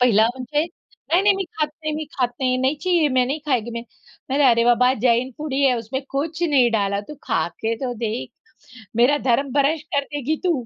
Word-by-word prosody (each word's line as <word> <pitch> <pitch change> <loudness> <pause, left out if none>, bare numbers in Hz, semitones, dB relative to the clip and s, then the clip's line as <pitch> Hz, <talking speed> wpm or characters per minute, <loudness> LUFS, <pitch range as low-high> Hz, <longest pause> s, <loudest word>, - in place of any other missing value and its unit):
पहिला 225 -3 +5
म्हणजे, 260 +4 -1
"नाही-नाही 370 +3 0
मी 390 - -2
खात 305 - +2 0.2
नाही, 310 0 -2
मी 310 +1 -3
खात 250 -2 0
नाही. 255 -1 +2
नहीं 265 +3 +1
चाहिए, 345 -4 +3
मैं 255 -2 +2
नहीं 280 +5 -2
खाएगी 240 -5 0
मैं" 235 0 -5 0.5
"नाही-नाही" 275 -1 +4
"अरे 235 0 +3
बाबा, 245 +1 +4
जैन 245 +1 +3
फूड 300 -2 -5
ही 275 +1 +1
है, 260 -2 +4
उसमे 235 +4 -4 0.2
कुछ 315 +4 -2
नहीं 275 -8 +4
डाला. 200 -2 0
तू 300 - -7
खाके 225 - -1
तो 250 - -2
देख!" 215 - -3 0.7
"मेरा 255 +5 +4
धर्म 265 +3 +2
भ्र्ष्ट 290 +3 +1
कर 285 0 +2
देगी 290 +2 -1
तू!" 360 - +3
265 Hz, 205 wpm, -22 LUFS, 240-300 Hz, 0.7 s, पहिला